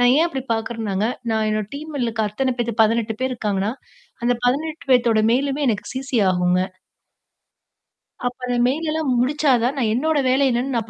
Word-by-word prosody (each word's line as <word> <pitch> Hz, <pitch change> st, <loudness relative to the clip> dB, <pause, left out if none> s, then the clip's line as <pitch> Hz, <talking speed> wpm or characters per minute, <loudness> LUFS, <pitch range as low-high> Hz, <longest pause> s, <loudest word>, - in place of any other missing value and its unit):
நான் 245 Hz, 0 st, +5 dB
ஏன் 325 Hz, -, +4 dB
அப்பிடி 270 Hz, -5 st, -5 dB
பார்க்குறேன்னாங்க, 220 Hz, -3 st, -2 dB, 0.3 s
நான் 220 Hz, 0 st, +1 dB
என்னோட 215 Hz, -1 st, -2 dB
டீம்ல 295 Hz, -3 st, -4 dB
இருக்க 225 Hz, -1 st, -1 dB
அத்தன 255 Hz, +4 st, -1 dB
பேத்து 235 Hz, -2 st, -1 dB
18 220 Hz, 0 st, +1 dB
பேர் 260 Hz, 0 st, 0 dB
இருக்காங்கன்னா, 210 Hz, -2 st, -1 dB, 0.5 s
அந்த 245 Hz, -, +3 dB
18 300 Hz, +2 st, -1 dB
பேத்தோட 235 Hz, -3 st, +4 dB
மேலுமே 280 Hz, +3 st, 0 dB
எனக்கு 210 Hz, -4 st, -1 dB
சிசி 260 Hz, -1 st, -2 dB
ஆகுங்க. 180 Hz, 0 st, +2 dB, 1.7 s
அப்பறம் 245 Hz, -1 st, -1 dB
மெயில் 315 Hz, +5 st, -1 dB
எல்லாம் 315 Hz, -3 st, -1 dB
முடிச்சாதான் 260 Hz, -1 st, +2 dB
நான் 225 Hz, -5 st, +1 dB
என்னோட 310 Hz, +6 st, +1 dB
வேலை 270 Hz, +2 st, +3 dB
என்னன்னு 250 Hz, +2 st, -1 dB
நான் 225 Hz, -1 st, -3 dB
245 Hz, 160 wpm, -21 LUFS, 220-270 Hz, 1.7 s, நான்